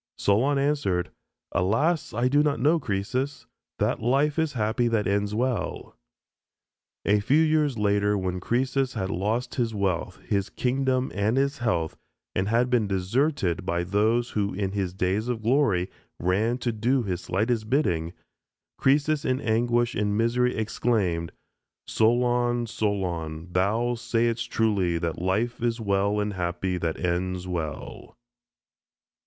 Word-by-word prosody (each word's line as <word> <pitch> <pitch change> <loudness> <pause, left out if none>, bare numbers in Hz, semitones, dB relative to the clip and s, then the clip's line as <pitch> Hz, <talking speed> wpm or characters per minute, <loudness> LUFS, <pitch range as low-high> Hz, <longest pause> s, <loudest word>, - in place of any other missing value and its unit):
Solon 125 +8 +2
answered, 135 -11 0 0.4
"Alas, 140 - +1
I 120 +3 +1
do 145 +3 +4
not 150 -4 +1
know, 155 +6 +3
Croesus; 130 +5 -2 0.3
that - - 0
life 140 +6 +2
is 160 -2 0
happy 115 +1 +1
that 115 -3 +1
ends 100 +2 0
well." 125 +1 -2 1.1
A 105 +1 +4
few 140 +10 +3
years 155 -5 +2
later 105 0 +2
when 90 -1 -2
Croesus 130 +5 0
had 95 -3 -2
lost 110 +7 -1
his 115 -4 -1
wealth, 95 -2 -1
his 100 -2 -1
kingdom, 130 +1 0
and 105 +4 +1
his 140 +1 +1
health, 85 -9 -1 0.4
and 95 - 0
had 120 +3 +2
been 115 -4 +2
deserted 95 - 0
by 85 -1 -1
those 110 +6 +1
who 100 -2 -1
in 95 -1 -1
his 95 -3 -2
days 95 +4 0
of 120 -3 -3
glory 110 -8 +2 0.3
ran 105 +7 +1
to 125 -1 -1
do 120 +4 +1
his 95 -4 -3
slightest 110 +3 -1
bidding, 85 - +1 0.7
Croesus 145 +2 +2
in 130 0 0
anguish 120 0 +1
and 105 0 0
misery 125 +2 +2
exclaimed, 105 -6 0 0.5
"Solon, 120 +1 +2
Solon, 90 -7 -3
thou 110 +6 +1
saidst 115 -1 -1
truly 100 -6 +1
that 85 -1 -3
life 105 +7 0
is 120 0 0
well 100 -1 +1
and 105 0 -1
happy 90 0 -2
that 80 -1 -2
ends 90 +1 -1
well." 80 -5 -5
110 Hz, 140 wpm, -26 LUFS, 95-125 Hz, 1.1 s, do